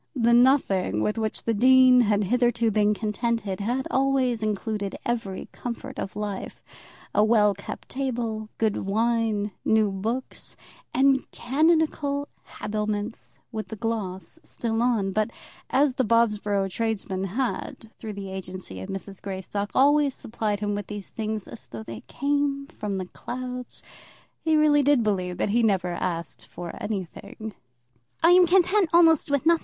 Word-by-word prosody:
The 235 Hz, -2 st, +3 dB
nothing 235 Hz, -, +3 dB
with 210 Hz, +2 st, 0 dB
which 220 Hz, -1 st, -2 dB
the 230 Hz, -, +1 dB
dean 255 Hz, +2 st, +6 dB
had 210 Hz, -2 st, +2 dB
hitherto 235 Hz, +1 st, +2 dB
been 210 Hz, 0 st, +3 dB
contented 215 Hz, -2 st, -2 dB
had 245 Hz, +6 st, -1 dB
always 265 Hz, -3 st, +2 dB
included 210 Hz, -1 st, -2 dB
every 225 Hz, -6 st, -3 dB
comfort 260 Hz, +2 st, -6 dB
of 195 Hz, -, -5 dB
life, 205 Hz, -2 st, -5 dB, 0.5 s
a 210 Hz, -, +4 dB
well 215 Hz, -2 st, +4 dB
kept 200 Hz, +1 st, -9 dB
table, 230 Hz, -5 st, -3 dB
good 220 Hz, -2 st, +1 dB
wine, 220 Hz, 0 st, 0 dB
new 220 Hz, -2 st, +3 dB
books, 225 Hz, +7 st, -4 dB, 0.4 s
and 270 Hz, +1 st, +3 dB
canonical 290 Hz, 0 st, +1 dB, 0.3 s
habiliments 210 Hz, 0 st, -3 dB, 0.2 s
with 220 Hz, -2 st, -4 dB
the 220 Hz, -, -6 dB
gloss 215 Hz, -, -4 dB
still 225 Hz, -7 st, -2 dB
on; 225 Hz, -6 st, +1 dB
but 215 Hz, +3 st, 0 dB, 0.4 s
as 280 Hz, 0 st, +3 dB
the 260 Hz, -, +1 dB
Bobsborough 210 Hz, -4 st, +2 dB
tradesmen 195 Hz, -3 st, -2 dB
had, 225 Hz, +1 st, -3 dB
through 220 Hz, -2 st, -6 dB
the 195 Hz, -1 st, -7 dB
agency 185 Hz, -, -6 dB
of 95 Hz, -, -7 dB
Mrs. 195 Hz, 0 st, -7 dB
Greystock, 200 Hz, +1 st, -4 dB
always 285 Hz, 0 st, +4 dB
supplied 215 Hz, -2 st, -3 dB
him 205 Hz, 0 st, -1 dB
with 205 Hz, -1 st, -4 dB
these 205 Hz, -2 st, -7 dB
things 215 Hz, -2 st, -4 dB
as 225 Hz, -, -11 dB
though 115 Hz, -2 st, -8 dB
they 115 Hz, -1 st, -8 dB
came 280 Hz, 0 st, 0 dB
from 205 Hz, -2 st, -3 dB
the 185 Hz, -, -3 dB
clouds, 250 Hz, +5 st, -7 dB, 0.6 s
he 320 Hz, -1 st, +3 dB
really 300 Hz, -1 st, +5 dB
did 280 Hz, -3 st, +4 dB
believe 185 Hz, -4 st, -1 dB
that 200 Hz, -, 0 dB
he 230 Hz, -, +2 dB
had 230 Hz, -, +4 dB
never 185 Hz, -4 st, +1 dB
asked 165 Hz, -10 st, -4 dB
for 175 Hz, +4 st, -7 dB
anything. 205 Hz, +2 st, -5 dB, 0.7 s
"I 335 Hz, -, +7 dB
am 360 Hz, 0 st, +7 dB
content 370 Hz, +1 st, +4 dB
almost 330 Hz, -3 st, +5 dB
with 285 Hz, +1 st, +1 dB
nothing. 335 Hz, 0 st, +5 dB
220 Hz, 150 wpm, -25 LUFS, 200-255 Hz, 0.7 s, I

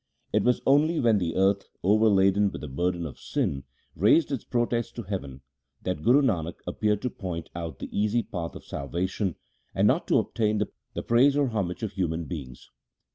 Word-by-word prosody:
It 105 Hz, -1 st, +3 dB
was 125 Hz, 0 st, +2 dB
only 155 Hz, +4 st, +4 dB
when 115 Hz, -4 st, +3 dB
the 85 Hz, -3 st, -2 dB
earth, 95 Hz, +1 st, +2 dB
overladen 100 Hz, 0 st, +4 dB
with -, -, -7 dB
the 75 Hz, -, -5 dB
burden 85 Hz, +5 st, -1 dB
of 75 Hz, -, -8 dB
sin, 70 Hz, -1 st, -2 dB, 0.3 s
raised 115 Hz, -, +4 dB
its 135 Hz, -, -2 dB
protest 120 Hz, -1 st, -1 dB
to 120 Hz, -, -5 dB
heaven, 70 Hz, -10 st, -5 dB, 0.4 s
that 90 Hz, -4 st, -2 dB
Guru 130 Hz, -, +5 dB
Nanak 85 Hz, -9 st, 0 dB
appeared 105 Hz, -1 st, 0 dB
to 125 Hz, -, -1 dB
point 85 Hz, -3 st, -6 dB
out 85 Hz, -2 st, -5 dB
the -, -, -8 dB
easy 105 Hz, +3 st, +1 dB
path 85 Hz, -4 st, -5 dB
of -, -, -10 dB
salvation, 90 Hz, +6 st, -2 dB, 0.4 s
and -, -, +4 dB
not -, -, +2 dB
to -, -, +4 dB
obtain 110 Hz, -1 st, 0 dB, 0.4 s
the -, -, -3 dB
praise 135 Hz, +5 st, +4 dB
or 140 Hz, -3 st, +2 dB
homage 100 Hz, -4 st, -2 dB
of 110 Hz, -, -2 dB
human 85 Hz, -3 st, -2 dB
beings. 70 Hz, -8 st, -8 dB
100 Hz, 185 wpm, -27 LUFS, 85-115 Hz, 0.4 s, Guru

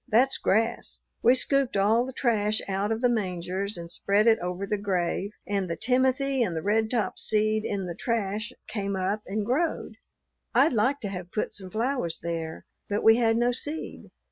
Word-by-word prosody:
That's 255 Hz, +5 st, +3 dB
grass. 225 Hz, +3 st, 0 dB, 0.2 s
We 245 Hz, +2 st, +6 dB
scooped 270 Hz, -3 st, +1 dB
all 220 Hz, +5 st, +3 dB
the -, -, -5 dB
trash 215 Hz, -5 st, +1 dB
out 200 Hz, +2 st, -1 dB
of 225 Hz, +1 st, -1 dB
the 250 Hz, -, +4 dB
mangers, 190 Hz, -3 st, -2 dB
and 170 Hz, 0 st, -7 dB
spread 200 Hz, +2 st, +2 dB
it 225 Hz, -1 st, +5 dB
over 180 Hz, +2 st, -3 dB
the 210 Hz, +1 st, -2 dB
grave, 190 Hz, -1 st, -1 dB, 0.2 s
and 195 Hz, -3 st, -1 dB
the 170 Hz, -, -1 dB
timothy 260 Hz, -, +1 dB
and 185 Hz, -8 st, 0 dB
the 160 Hz, -, -3 dB
redtop 220 Hz, 0 st, 0 dB
seed 215 Hz, 0 st, +1 dB
in 195 Hz, -2 st, -2 dB
the 175 Hz, -, -4 dB
trash 220 Hz, +2 st, -2 dB, 0.2 s
came 200 Hz, -2 st, -3 dB
up 190 Hz, +3 st, -1 dB
and 205 Hz, +2 st, -2 dB
growed. 305 Hz, +8 st, -1 dB, 0.6 s
I'd 315 Hz, -, +5 dB
liked 255 Hz, +5 st, +1 dB
to 200 Hz, -, -2 dB
have 180 Hz, -2 st, -7 dB
put 210 Hz, -, -2 dB
some 190 Hz, -2 st, -6 dB
flowers 225 Hz, -5 st, -1 dB
there, 165 Hz, -1 st, -4 dB, 0.2 s
but 205 Hz, 0 st, -1 dB
we 225 Hz, +1 st, +7 dB
had 225 Hz, -1 st, +3 dB
no 240 Hz, +1 st, +3 dB
seed." 295 Hz, +6 st, -4 dB
215 Hz, 185 wpm, -27 LUFS, 195-240 Hz, 0.6 s, we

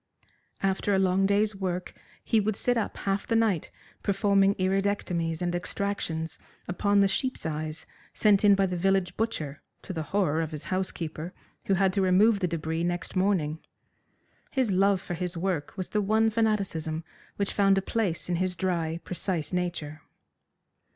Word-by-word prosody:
After 195 Hz, +1 st, +1 dB
a -, -, +3 dB
long 190 Hz, 0 st, +3 dB
day's 205 Hz, +1 st, +2 dB
work 185 Hz, -2 st, -3 dB, 0.3 s
he 225 Hz, -, +3 dB
would 215 Hz, 0 st, 0 dB
sit 245 Hz, +3 st, +1 dB
up 230 Hz, -, -2 dB
half 195 Hz, 0 st, -1 dB
the 230 Hz, -, +1 dB
night 220 Hz, -8 st, +2 dB, 0.3 s
performing 200 Hz, 0 st, +3 dB
iridectomies 185 Hz, -3 st, 0 dB
and 175 Hz, 0 st, 0 dB
extractions 175 Hz, -3 st, -3 dB, 0.3 s
upon 200 Hz, +3 st, +2 dB
the 200 Hz, -, +5 dB
sheep's 255 Hz, +3 st, -2 dB
eyes 155 Hz, 0 st, -3 dB, 0.3 s
sent 210 Hz, -2 st, +3 dB
in 205 Hz, -1 st, +7 dB
by 195 Hz, 0 st, +3 dB
the 180 Hz, -1 st, -2 dB
village 190 Hz, 0 st, +1 dB
butcher, 155 Hz, -11 st, -3 dB, 0.2 s
to -, -, -6 dB
the 160 Hz, -, -3 dB
horror 175 Hz, -6 st, +1 dB
of 160 Hz, -, -2 dB
his 155 Hz, -2 st, -6 dB
housekeeper, 175 Hz, -2 st, -3 dB, 0.3 s
who 195 Hz, -, +2 dB
had 190 Hz, 0 st, +2 dB
to 195 Hz, -, +1 dB
remove 200 Hz, +3 st, +4 dB
the 180 Hz, -, +1 dB
debris 160 Hz, 0 st, -2 dB
next 175 Hz, +2 st, -2 dB
morning. 185 Hz, -5 st, +1 dB, 0.9 s
His 260 Hz, -6 st, +1 dB
love 195 Hz, +1 st, +3 dB
for 180 Hz, -, -6 dB
his 180 Hz, 0 st, -3 dB
work 175 Hz, -2 st, -2 dB
was 185 Hz, -, -3 dB
the 210 Hz, -, +1 dB
one 220 Hz, +2 st, +3 dB
fanaticism 195 Hz, -8 st, 0 dB, 0.3 s
which 200 Hz, -1 st, -1 dB
found 195 Hz, -1 st, +4 dB
a -, -, +2 dB
place 195 Hz, -6 st, 0 dB
in 175 Hz, -1 st, 0 dB
his 185 Hz, 0 st, -1 dB
dry, 170 Hz, -3 st, -1 dB
precise 180 Hz, -2 st, -3 dB
nature. 170 Hz, -4 st, -3 dB
190 Hz, 165 wpm, -28 LUFS, 170-200 Hz, 0.9 s, in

